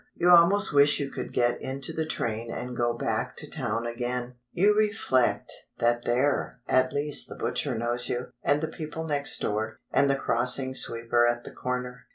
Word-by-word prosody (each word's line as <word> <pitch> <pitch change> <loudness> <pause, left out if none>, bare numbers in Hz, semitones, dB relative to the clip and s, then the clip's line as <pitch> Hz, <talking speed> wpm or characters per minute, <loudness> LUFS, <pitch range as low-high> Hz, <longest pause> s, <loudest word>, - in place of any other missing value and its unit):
You 175 +1 +3
almost 175 +3 +6
wish 145 +1 +5
you 140 -1 -3
could - - -6
get 120 -1 +1
into 135 0 -4
the 160 -1 -2
train 115 -4 -3
and 125 +1 -5
go 120 0 +1
back - - -2
to - - -4
town 115 +2 -3
again; 120 +1 -3 0.2
you 205 +4 +3
reflect 210 - +1 0.2
that 120 0 +1
there 130 +1 0
at 130 0 +3
least 145 0 0
the - - -8
butcher 130 -5 -2
knows 120 +1 -1
you, 125 +1 -3
and 145 +1 +2
the 160 - -1
people 160 0 -6
next 145 -3 0
door, 110 +1 -2 0.2
and 140 - +4
the 140 - +3
crossing 130 +1 +2
sweeper 120 -1 +1
at 120 0 -1
the - - -9
corner. 125 0 -5
125 Hz, 185 wpm, -27 LUFS, 120-145 Hz, 0.2 s, almost